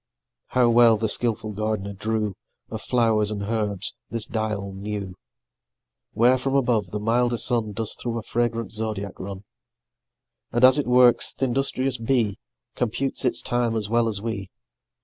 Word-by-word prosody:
How 125 -1 +2
well 115 -1 +5
the 110 +1 -1
skillful 110 -1 +2
gard'ner 105 -1 -3
drew 110 0 -2 0.4
Of - - -5
flow'rs 110 -4 +2
and 105 -2 -3
herbs 105 -2 0
this 115 -1 -2
dial 105 -3 -3
new, 100 -1 -5 1.0
Where 125 +3 +4
from 135 +1 -1
above 120 -8 +1
the 105 - -4
milder 120 +3 +1
sun 115 -2 -1
Does 110 +1 -2
through 115 -1 -4
a 115 - -5
fragrant 115 -2 -2
zodiac 105 -3 -4
run; 95 0 -7 1.1
And 120 +2 0
as 130 +2 +7
it 145 - -2
works, 125 -1 +5
th' - - -5
industrious 130 0 0
bee 115 -4 0 0.3
Computes 130 +3 -1
its 125 - 0
time 120 -2 0
as 105 -2 -2
well 115 0 +2
as 105 -3 -2
we. 100 -4 -4
115 Hz, 155 wpm, -24 LUFS, 105-120 Hz, 1.1 s, as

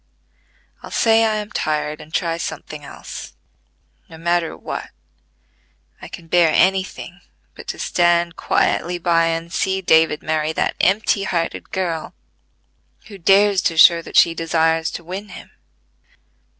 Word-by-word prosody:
I'll - - -10
say 225 0 +3
I 215 -1 +1
am 210 0 -5
tired 150 0 -2
and 155 - -14
try 165 0 -1
something 155 -2 -7
else, 140 - -9 0.8
no 160 - -12
matter 170 0 -1
what: - - -6 1.1
I - - -9
can 170 - -11
bear 165 -1 +3
any 190 +3 +3
thing, 185 0 -11 0.3
but - - -13
to - - -5
stand 175 -1 +1
quietly 175 +1 0
by 170 -1 +2
and 165 +1 -3
see 190 0 0
David 160 -4 +3
marry 155 0 -1
that - - -1
empty 200 +1 +2
hearted 170 -3 -3
girl, 170 -4 -3 0.9
who 200 -2 -11
dares 195 +2 +4
to 165 - -1
show 170 +1 +7
that - - -4
she 165 - +6
desires 165 0 0
to 175 - -8
win 190 +4 -7
him. - - -12
170 Hz, 145 wpm, -20 LUFS, 160-190 Hz, 1.1 s, show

